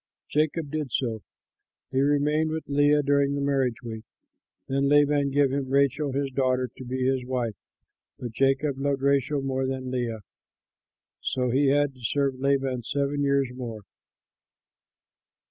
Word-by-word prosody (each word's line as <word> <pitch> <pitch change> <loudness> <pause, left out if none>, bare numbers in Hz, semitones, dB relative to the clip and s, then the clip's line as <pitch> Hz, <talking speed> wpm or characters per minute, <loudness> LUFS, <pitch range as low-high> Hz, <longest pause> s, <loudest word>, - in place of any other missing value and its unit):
Jacob 155 0 0
did 155 -4 -3
so: 115 -3 -1 0.7
he 130 - +2
remained 145 +2 +2
with 160 0 -4
Leah 145 +1 +3
during 140 0 +2
the - - -2
marriage 135 -4 0
week. 110 -2 -6 0.6
Then 135 +1 +1
Laban 145 -1 +4
gave 140 -1 +2
him 135 -1 -2
Rachel 140 +1 +2
his 135 0 -1
daughter 130 -1 +1
to - - -9
be 130 +1 -2
his 130 -1 +1
wife, 125 -3 -2 0.6
but 120 - -6
Jacob 135 +3 +1
loved 140 -1 -1
Rachel 140 0 +2
more 135 -1 -1
than 130 -1 -4
Leah. 120 -4 -2 1.0
So 125 -1 -1
he 140 +3 +3
had 145 0 +2
to 130 - -18
serve 135 +2 0
Laban 135 -2 +1
seven 140 +3 -1
years 140 -2 +2
more. 120 -4 -6
135 Hz, 145 wpm, -26 LUFS, 130-145 Hz, 1.0 s, Laban